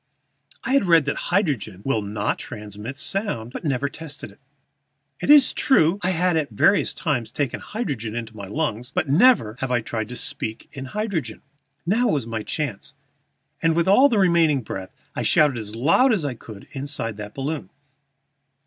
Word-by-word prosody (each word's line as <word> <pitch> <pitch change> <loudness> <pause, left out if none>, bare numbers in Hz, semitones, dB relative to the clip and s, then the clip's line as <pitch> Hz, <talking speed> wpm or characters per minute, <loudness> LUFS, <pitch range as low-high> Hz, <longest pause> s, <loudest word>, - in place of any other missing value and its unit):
I 260 - -1
had 275 -7 +4
read 165 -4 +5
that 150 - -1
hydrogen 135 - 0
will 125 -5 +1
not 105 0 -2
transmit 105 +2 -8
sound, 140 - -1
but - - -5
had 155 - -1
never 135 +1 0
tested 150 +1 -8
it. - - -21 0.8
It - - -3
is 290 -3 +7
true 190 - +3
I 180 - 0
had 180 -1 +1
at 150 -4 -1
various 160 - +3
times 130 -9 -1
taken 140 -5 -2
hydrogen 135 - -4
into 115 -1 -5
my 100 -2 -7
lungs, 125 -1 -2
but 155 - -1
never 155 - +4
had 135 -1 -2
I 120 -1 +2
tried 110 -1 -4
to 125 - -6
speak 110 -2 -4
in 135 -1 -6
hydrogen. 170 - -3 0.4
Now 225 +8 +2
was 145 - 0
my 115 -1 -4
chance, 125 -3 -4 0.7
and, 165 0 +2
with 170 +1 +1
all 255 +9 +6
my 235 - +1
remaining 170 -8 +3
breath 95 -3 -6 0.2
I - - -2
shouted 145 -5 +3
as 105 0 -7
loud 165 - +4
as 190 -9 +1
I 140 - -2
could 110 -3 -12
inside 135 -6 -3
that 105 0 -8
balloon. 145 +3 -4
140 Hz, 180 wpm, -23 LUFS, 110-170 Hz, 0.8 s, is